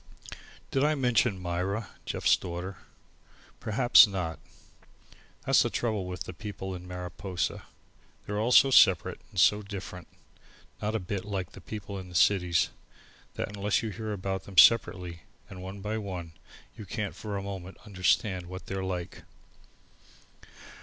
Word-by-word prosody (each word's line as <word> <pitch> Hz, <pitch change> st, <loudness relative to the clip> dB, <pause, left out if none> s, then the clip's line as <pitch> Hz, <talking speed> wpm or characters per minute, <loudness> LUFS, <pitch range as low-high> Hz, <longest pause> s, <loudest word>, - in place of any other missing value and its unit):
Did 135 Hz, -, +2 dB
I 155 Hz, +1 st, +3 dB
mention 120 Hz, -6 st, +2 dB
Myra, 90 Hz, +4 st, -2 dB, 0.2 s
Jeff's -, -, +3 dB
daughter? 90 Hz, +2 st, -6 dB, 0.8 s
Perhaps 120 Hz, +2 st, +6 dB
not. 90 Hz, -5 st, -4 dB, 1.1 s
That's -, -, +5 dB
the -, -, +1 dB
trouble 110 Hz, -6 st, -1 dB
with 90 Hz, 0 st, -4 dB
the -, -, -8 dB
people 95 Hz, 0 st, -6 dB
in 90 Hz, 0 st, -8 dB
Mariposa; 90 Hz, 0 st, -4 dB, 0.6 s
they're 105 Hz, 0 st, -3 dB
all 115 Hz, +3 st, +1 dB
so 135 Hz, +2 st, +7 dB
separate 95 Hz, -8 st, +5 dB
and 95 Hz, -, -4 dB
so 105 Hz, +4 st, +5 dB
different 95 Hz, -4 st, -8 dB, 0.7 s
not 105 Hz, +1 st, -1 dB
a -, -, +1 dB
bit 95 Hz, +1 st, -4 dB
like 95 Hz, -4 st, -4 dB
the 95 Hz, -, -12 dB
people 100 Hz, 0 st, -6 dB
in 90 Hz, -1 st, -9 dB
the 90 Hz, -, -11 dB
cities 90 Hz, -2 st, +3 dB, 0.6 s
that 100 Hz, -, -4 dB
unless 100 Hz, +3 st, 0 dB
you 110 Hz, -, -3 dB
hear 110 Hz, +1 st, -5 dB
about 95 Hz, -1 st, -3 dB
them 95 Hz, -2 st, -12 dB
separately 90 Hz, -7 st, +5 dB, 0.3 s
and 95 Hz, -2 st, -8 dB
one 95 Hz, +2 st, -7 dB
by 105 Hz, +2 st, -2 dB
one 90 Hz, -5 st, -6 dB, 0.4 s
you 105 Hz, -, -10 dB
can't 105 Hz, 0 st, -3 dB
for 105 Hz, -2 st, -5 dB
a 95 Hz, -, -4 dB
moment 95 Hz, -2 st, -7 dB
understand 95 Hz, -2 st, +1 dB
what 95 Hz, +1 st, -8 dB
they're 95 Hz, 0 st, -4 dB
like. 90 Hz, -2 st, -4 dB
95 Hz, 150 wpm, -29 LUFS, 90-105 Hz, 1.1 s, so